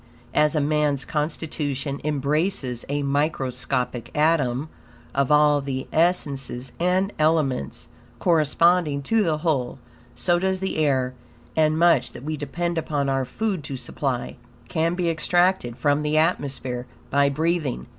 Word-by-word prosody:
As 150 +1 +3
man's 150 -2 +1
constitution 150 -2 -3
embraces 150 -2 -1
a 145 0 -1
microscopic 130 -4 -1
atom 150 -3 +2 0.5
of 140 0 +1
all 150 -1 +5
the 135 -1 -4
essences 140 -7 0
and 185 +3 +1
elements, 155 - 0 0.3
corresponding 165 -2 +3
to 225 +9 +2
the 165 -6 +1
whole; 150 -7 -1 0.4
so 175 -1 +1
does 190 +1 0
the 190 0 -2
air; 130 -4 +1 0.4
and 155 0 +3
much, 170 -5 +3
that - - -10
we 155 +2 -2
depend 170 +3 -2
upon 145 -3 -1
our 135 -1 0
food 200 - -2
to 135 -2 -5
supply, 125 0 -3 0.3
can 165 +1 0
be 180 -1 -1
extracted 175 -5 +1
from 145 0 +2
the 150 +1 0
atmosphere 135 -6 -1 0.2
by 140 0 +4
breathing. 160 -1 -1
150 Hz, 130 wpm, -24 LUFS, 135-165 Hz, 0.5 s, all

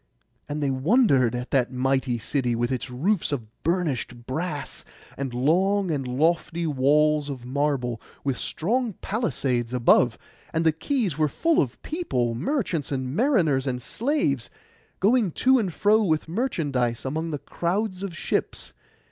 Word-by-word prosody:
And 150 0 -2
they 140 - +1
wondered 135 - +3
at 125 +1 -5
that 125 -2 +2
mighty 130 -1 0
city, 125 +1 -1
with 120 +2 -1
its 130 0 -3
roofs 155 +9 0
of 130 -6 -2 0.2
burnished 145 - -1
brass, 150 +2 -3 0.3
and 135 -2 -3
long 180 +9 +2
and 135 -4 -2
lofty 165 +5 +1
walls 150 +1 +2
of 130 -3 -6
marble, 130 -3 -1 0.2
with 135 -2 0
strong 230 +6 -1
palisades 130 - -1
above. 120 -1 +4 0.4
And 165 +1 +1
the 160 - +6
quays 195 - -1
were 155 - +4
full 330 - +2
of 130 -3 -3
people, 125 - -1
merchants, 170 - -1
and 130 0 -2
mariners, 170 - +2
and 125 -1 -1
slaves, 210 - -1 0.5
going 220 +1 +3
to 260 0 +4
and 195 -6 -1
fro 210 +6 +3
with 160 -7 +1
merchandise 145 - -1
among 160 +5 -2
the 150 - -2
crowd 185 +7 -2
of 190 -5 -5
ships. - - -2
150 Hz, 145 wpm, -25 LUFS, 130-190 Hz, 0.5 s, the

